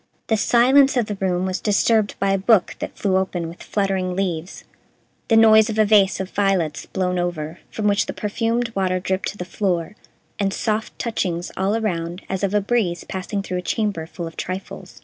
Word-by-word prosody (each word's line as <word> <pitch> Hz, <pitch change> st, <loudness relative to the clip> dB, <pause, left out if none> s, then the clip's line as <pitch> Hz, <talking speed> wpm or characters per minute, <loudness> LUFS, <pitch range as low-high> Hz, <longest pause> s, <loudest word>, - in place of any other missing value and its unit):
The 220 Hz, -, +4 dB
silence 260 Hz, +5 st, +4 dB
of 240 Hz, -, +2 dB
the 210 Hz, -, -4 dB
room 185 Hz, -1 st, 0 dB
was 185 Hz, 0 st, -2 dB
disturbed 215 Hz, 0 st, +2 dB
by 195 Hz, 0 st, +1 dB
a 195 Hz, -, +2 dB
book 200 Hz, -1 st, +3 dB
that -, -, -6 dB
flew 190 Hz, -2 st, +1 dB
open 180 Hz, -3 st, -2 dB
with 170 Hz, +2 st, -10 dB
fluttering 190 Hz, -3 st, -1 dB
leaves, 180 Hz, -2 st, -3 dB, 0.6 s
the 225 Hz, -, +4 dB
noise 220 Hz, 0 st, +6 dB
of 220 Hz, -, -3 dB
a 215 Hz, -, +5 dB
vase 200 Hz, -2 st, +4 dB
of 190 Hz, -1 st, -4 dB
violets 195 Hz, -6 st, 0 dB
blown 180 Hz, -1 st, -1 dB
over, 175 Hz, -1 st, -3 dB
from 210 Hz, -1 st, -2 dB
which 200 Hz, 0 st, +2 dB
the -, -, -4 dB
perfumed 230 Hz, +2 st, -1 dB
water 185 Hz, -2 st, 0 dB
dripped 190 Hz, +1 st, -2 dB
to 205 Hz, -, -6 dB
the 180 Hz, -, -5 dB
floor, 185 Hz, -1 st, -2 dB, 0.4 s
and 195 Hz, -1 st, 0 dB
soft 220 Hz, 0 st, -2 dB
touchings 180 Hz, -7 st, -2 dB
all 195 Hz, +3 st, 0 dB
around 175 Hz, -4 st, -3 dB
as 190 Hz, +1 st, -3 dB
of 200 Hz, +1 st, 0 dB
a 205 Hz, -, +3 dB
breeze 200 Hz, -5 st, 0 dB
passing 195 Hz, +2 st, -4 dB
through 180 Hz, -2 st, -3 dB
a -, -, -4 dB
chamber 195 Hz, -4 st, -2 dB
full 170 Hz, 0 st, -6 dB
of 165 Hz, -, -8 dB
trifles. 185 Hz, +1 st, -6 dB
195 Hz, 200 wpm, -22 LUFS, 180-215 Hz, 0.6 s, noise